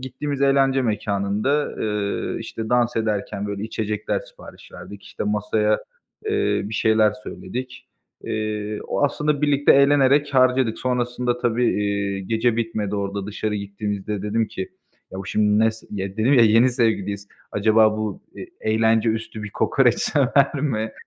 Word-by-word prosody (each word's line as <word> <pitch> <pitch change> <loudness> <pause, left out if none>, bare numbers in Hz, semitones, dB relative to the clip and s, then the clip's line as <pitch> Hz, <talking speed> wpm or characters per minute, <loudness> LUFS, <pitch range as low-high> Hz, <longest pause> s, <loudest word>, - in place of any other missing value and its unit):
gittiğimiz 140 +2 -4
eğlence 135 -1 +3
mekânında, 105 +5 0
ııı, 105 -2 -3
işte, 110 -1 -6
dans 120 -1 +2
ederken, 105 -2 -2
böyle, 100 0 -4
içecekler 110 -1 -2
sipariş - - -15
verdik, 100 -1 -10
işte, 100 - -6
masaya, 105 +1 +1 0.5
eee, 415 -1 +1
bir 105 +2 -6
şeyler 110 -1 +3
söyledik. 130 +1 -8 0.3
Eee, 105 -1 -3
o - - +1
aslında 150 0 0
birlikte 145 -1 +4
eğlenerek 140 0 +4
harcadık. 130 -3 +3
Sonrasında 125 -1 -1
tabii, 120 0 +1 0.2
eee, 100 -1 -1
gece 115 +4 0
bitmedi 110 -3 -2
orada, 100 0 -3
dışarı 105 0 -3
gittiğimizde 100 0 -4
dedim 110 +2 0
ki: 95 -3 -5 0.4
"Ya, 95 - -7
bu 95 - -6
şimdi 105 0 +2
ne 110 0 +4
s" 110 - -14
ya, 100 -1 -3
dedim 115 +6 +2
ya 120 - +6
yeni 115 +4 +5
sevgiliyiz. 100 -5 -1 0.2
"Acaba 110 +1 +3
bu, 110 -2 -4
eee, - - -8
eğlence 110 +1 +2
üstü 110 -1 -5
bir 105 - -6
kokoreç - - +2
sever 140 +1 +2
mi?" 110 -6 -1
110 Hz, 150 wpm, -22 LUFS, 105-125 Hz, 0.5 s, ya